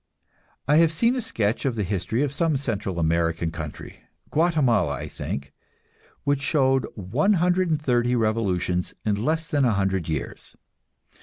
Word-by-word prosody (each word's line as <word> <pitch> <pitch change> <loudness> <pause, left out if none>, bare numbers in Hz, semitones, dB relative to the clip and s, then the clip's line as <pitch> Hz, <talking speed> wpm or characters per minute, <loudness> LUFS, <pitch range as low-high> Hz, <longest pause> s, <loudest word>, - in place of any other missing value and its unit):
I 150 +2 +5
have 165 -1 +5
seen 230 +10 +2
a 255 - -1
sketch 115 - -1
of 130 -4 0
the 105 - -1
history 100 +6 -1
of 145 -2 -2
some 155 0 +1
Central 105 -8 -3
American 85 0 +1
country 80 -3 -8 0.3
Guatemala, 140 - +2
I - - -6
think 70 +1 -6 0.7
which 140 -1 +1
showed 135 -3 +2
130 150 - +1
revolutions 100 -6 0
in 105 0 0
less 160 +3 0
than 145 -3 +1
a 120 -4 +3
hundred 95 -4 0
years. 75 -3 -5
120 Hz, 140 wpm, -24 LUFS, 95-150 Hz, 0.7 s, I